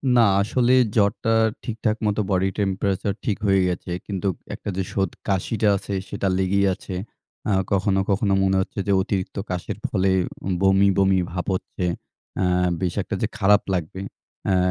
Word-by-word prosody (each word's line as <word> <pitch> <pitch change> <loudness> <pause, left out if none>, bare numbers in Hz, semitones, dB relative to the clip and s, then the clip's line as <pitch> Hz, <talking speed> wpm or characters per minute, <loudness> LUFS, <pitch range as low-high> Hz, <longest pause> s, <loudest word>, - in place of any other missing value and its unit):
না। 120 - +6 0.2
আসলে 125 +4 +2 0.2
জ্বরটা 105 +2 +2 0.3
ঠিকঠাক 110 -1 -1
মতো 105 +1 +1
body 95 +1 +2
temperature 100 0 0
ঠিক 105 - 0
হয়ে 95 -1 +4
গেছে। 90 0 -3 0.2
কিন্তু 100 -1 -2 0.3
একটা - - -6
যে 95 - 0
শোদ 95 -3 +1 0.2
কাশিটা 100 +3 0
আছে 100 - -6 0.2
সেটা 100 - -2
লেগেই 100 +1 +2
আছে। 95 - -8 0.6
আ - - +2 0.2
কখনো, 95 0 +2
কখনো 100 0 +2
মনে 95 0 +2
হচ্ছে 95 - -5
যে, - - +2
অতিরিক্ত 95 -1 -3
কাশের 90 +2 -3
ফলে 95 -2 +1 0.5
বমি, 95 +1 +5
বমি 95 -1 +4
ভাব 90 0 -3
হচ্ছে। 90 0 -4 0.6
আ - - +2 0.4
বেশ 90 -2 0
একটা - - -4
যে - - +2
খারাপ 105 +1 +5
লাগবে, 90 +2 -3 0.4
অ্যা 95 -1 +2
95 Hz, 160 wpm, -23 LUFS, 95-100 Hz, 0.6 s, না